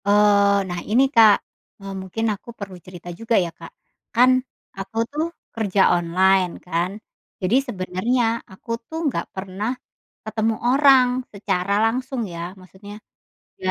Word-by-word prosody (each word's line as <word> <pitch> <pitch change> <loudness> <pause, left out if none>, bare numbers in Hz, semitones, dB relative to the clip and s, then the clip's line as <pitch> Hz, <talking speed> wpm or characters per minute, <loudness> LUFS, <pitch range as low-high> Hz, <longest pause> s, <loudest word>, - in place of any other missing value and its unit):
Eee, 200 0 +4
nah 175 -1 -3
ini, 240 +5 +5
Kak, 220 -3 +8 0.5
eee, 195 0 -7
mungkin 190 +4 -3
aku 205 - -12
perlu 195 -2 -7
cerita 175 -1 -10
juga 230 0 0
ya, 175 -3 0
Kak. - - -12 0.4
Kan, 250 +2 +6 0.5
aku 195 +3 -7
tuh 305 +2 -1 0.3
kerja 205 -3 +1
online 180 +2 +3
kan. 175 +1 -1 0.5
Jadi 185 +5 +2
sebenarnya 200 +4 -1 0.3
aku 190 +5 -16 0.2
tuh 320 - -6
nggak - - -3
pernah 195 +3 -4 0.6
ketemu 220 +1 0
orang 270 -1 +6 0.2
secara 200 -2 -1
langsung 255 +3 -1
ya, 170 +2 -5
maksudnya 190 +3 -12 0.6
iya. 185 - -1
200 Hz, 135 wpm, -22 LUFS, 185-225 Hz, 0.6 s, Kak